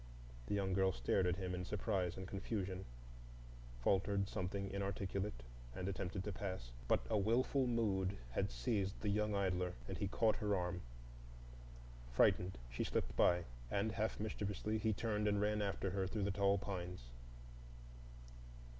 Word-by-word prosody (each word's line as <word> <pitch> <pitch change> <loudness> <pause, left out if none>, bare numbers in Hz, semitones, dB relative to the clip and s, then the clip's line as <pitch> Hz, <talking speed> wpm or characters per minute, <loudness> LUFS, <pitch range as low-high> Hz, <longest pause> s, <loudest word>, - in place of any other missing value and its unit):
The - - +1
young 95 -2 +1
girl 95 0 +4
stared 90 +8 +2
at 90 - +2
him 90 -1 -3
in 90 0 -2
surprise 90 -2 -1
and 95 -1 -5
confusion,—faltered - - -2
something 100 0 -2
inarticulate, 100 -6 -2 0.3
and 90 - -3
attempted 95 0 -2
to 105 - -2
pass. 95 -10 -4 0.2
But - - +3
a 110 -2 +2
wilful 125 +5 +3
mood 100 -5 +1
had - - 0
seized 95 - -1
the 105 - 0
young 105 0 +2
idler, 90 -2 +1
and 95 - -4
he 100 - +1
caught 110 +2 +3
at - - -9
her 105 -1 +2
arm. 90 -1 -1 1.3
Frightened, 90 +8 +4
she - - -2
slipped - - -1
by; 90 0 +5 0.3
and 100 - +1
half 110 0 -1
mischievously 105 0 -1
he 110 0 +2
turned 105 0 0
and 105 -1 +3
ran 105 +1 +2
after 100 -1 -1
her 95 0 0
through 105 +1 -1
the 100 - +1
tall 100 0 +3
pines. 90 -9 -5
95 Hz, 155 wpm, -39 LUFS, 90-105 Hz, 1.3 s, by